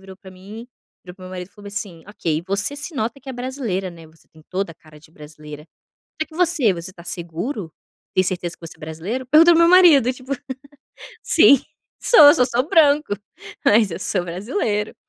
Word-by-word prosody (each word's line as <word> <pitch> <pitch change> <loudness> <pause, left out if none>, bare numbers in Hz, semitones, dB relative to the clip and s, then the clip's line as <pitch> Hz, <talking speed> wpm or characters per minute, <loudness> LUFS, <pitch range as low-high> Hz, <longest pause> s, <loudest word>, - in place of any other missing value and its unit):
virou 190 -1 -13
para 190 0 -15
mim, 205 +6 -12 0.4
virou 180 -1 -11
para 185 - -13
meu 185 - -10
marido 180 -1 -7
e - - -35
falou 205 0 -14
assim: 200 -5 -7
"Ok, 165 -6 -3
você 200 +8 0
se 295 +3 -7
nota 240 +1 -3
que 270 - -14
é - - -5
brasileira, 245 -7 -4
né, 165 -2 -14
você 160 +1 -23
tem 160 -1 -20
toda 190 -1 -3
a - - -24
cara 155 -1 -19
de 155 - -21
brasileira. 150 -1 -12 0.6
Será - - -1
que 315 - -16
você, 330 - +3
você 170 +2 -8
está 170 -2 -15
seguro? 170 - -5 0.4
Tem 185 - +2
certeza 175 -2 -3
que 170 - -13
você 160 - -10
é - - -29
brasileiro?". 165 +11 -6
Pergunto 320 +5 +6
ao 335 - +4
meu 335 0 +5
marido 315 -9 +6
tipo: 260 +2 -12 0.9
"Sim 280 - +5 0.4
sou, 475 - +4
eu 295 - +7
sou 250 - +3
só 245 -1 0
branco, 300 -6 +3 0.5
mas 215 -1 +4
eu 165 - -6
sou 185 -1 -2
brasileiro.", 210 - -3
200 Hz, 205 wpm, -20 LUFS, 170-260 Hz, 0.9 s, eu